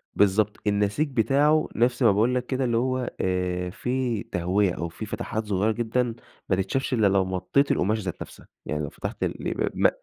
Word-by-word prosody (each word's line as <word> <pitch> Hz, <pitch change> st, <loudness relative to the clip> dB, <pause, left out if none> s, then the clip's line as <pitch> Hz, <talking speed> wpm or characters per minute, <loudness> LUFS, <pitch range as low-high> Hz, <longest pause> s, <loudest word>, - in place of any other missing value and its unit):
بالضبط، 105 Hz, +1 st, +3 dB
النسيج 105 Hz, +9 st, +1 dB
بتاعه 140 Hz, +6 st, +3 dB
نفْس 125 Hz, +2 st, +2 dB
ما 115 Hz, -, +7 dB
باقول 115 Hz, +6 st, +2 dB
لك 125 Hz, 0 st, -1 dB
كده، 130 Hz, 0 st, -1 dB
اللي 120 Hz, -2 st, +1 dB
هو 130 Hz, 0 st, 0 dB
آآ 90 Hz, -1 st, -1 dB
فيه 125 Hz, +1 st, -2 dB
تهوية 90 Hz, +2 st, +1 dB
أو 85 Hz, -1 st, -4 dB
فيه -, -, -7 dB
فتحات 110 Hz, 0 st, -4 dB
صغيّرة 105 Hz, +2 st, +1 dB
جدًا 120 Hz, +1 st, -1 dB, 0.3 s
ما 95 Hz, -, +4 dB
تتشافش 125 Hz, +8 st, -1 dB
إلّا 110 Hz, -4 st, +4 dB
لو 95 Hz, -1 st, +3 dB
مطّيت 95 Hz, +10 st, +1 dB
القماشة 105 Hz, +3 st, +1 dB
ذات 90 Hz, -, -5 dB
نفْسها، -, -, -10 dB, 0.2 s
يعني 75 Hz, 0 st, -2 dB
لو 70 Hz, -, -3 dB
فتحت -, -, -5 dB
الإ -, -, -2 dB
ب -, -, -1 dB
م -, -, +5 dB
110 Hz, 190 wpm, -25 LUFS, 95-125 Hz, 0.3 s, ما